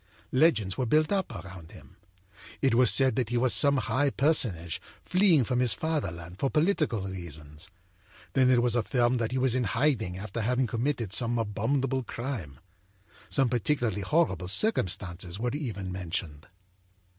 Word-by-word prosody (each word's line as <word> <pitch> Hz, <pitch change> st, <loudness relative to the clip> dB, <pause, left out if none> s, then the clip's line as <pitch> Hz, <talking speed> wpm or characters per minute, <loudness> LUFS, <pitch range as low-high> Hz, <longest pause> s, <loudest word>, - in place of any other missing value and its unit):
âLegends 125 Hz, -, +2 dB
were 130 Hz, -, -1 dB
built 155 Hz, +5 st, +2 dB
up 195 Hz, -2 st, 0 dB
around 90 Hz, -5 st, -9 dB
him. -, -, -15 dB, 0.6 s
It 135 Hz, -3 st, +2 dB
was 125 Hz, +1 st, +5 dB
said 135 Hz, -1 st, +3 dB
that 125 Hz, -4 st, 0 dB
he 120 Hz, -, 0 dB
was 125 Hz, +1 st, +3 dB
some 140 Hz, -1 st, +4 dB
high 130 Hz, +3 st, +1 dB
personage, 115 Hz, -, 0 dB, 0.2 s
fleeing 180 Hz, -6 st, +3 dB
from 125 Hz, +2 st, -1 dB
his 125 Hz, -2 st, +3 dB
fatherland 90 Hz, -, -4 dB
for 135 Hz, -, +1 dB
political 155 Hz, -, +1 dB
reasons; 80 Hz, -5 st, -8 dB, 0.6 s
then 130 Hz, -2 st, +4 dB
it 120 Hz, -2 st, +4 dB
was 125 Hz, -1 st, +2 dB
affirmed 120 Hz, +1 st, +1 dB
that 115 Hz, -1 st, -1 dB
he 130 Hz, -, -1 dB
was 130 Hz, -2 st, +2 dB
in 125 Hz, -1 st, 0 dB
hiding 115 Hz, -5 st, 0 dB
after 105 Hz, +3 st, -5 dB
having 125 Hz, +4 st, +1 dB
committed 115 Hz, -3 st, -2 dB
some 120 Hz, -1 st, 0 dB
abominable 130 Hz, +5 st, -1 dB
crime. 115 Hz, -, -6 dB, 0.7 s
Some 135 Hz, -2 st, +2 dB
particularly 120 Hz, -3 st, -1 dB
horrible 150 Hz, -, 0 dB
circumstances 95 Hz, -, 0 dB
were 120 Hz, +3 st, -2 dB
even 115 Hz, -10 st, -4 dB
mentioned. 85 Hz, -4 st, -5 dB
120 Hz, 155 wpm, -28 LUFS, 95-135 Hz, 0.7 s, was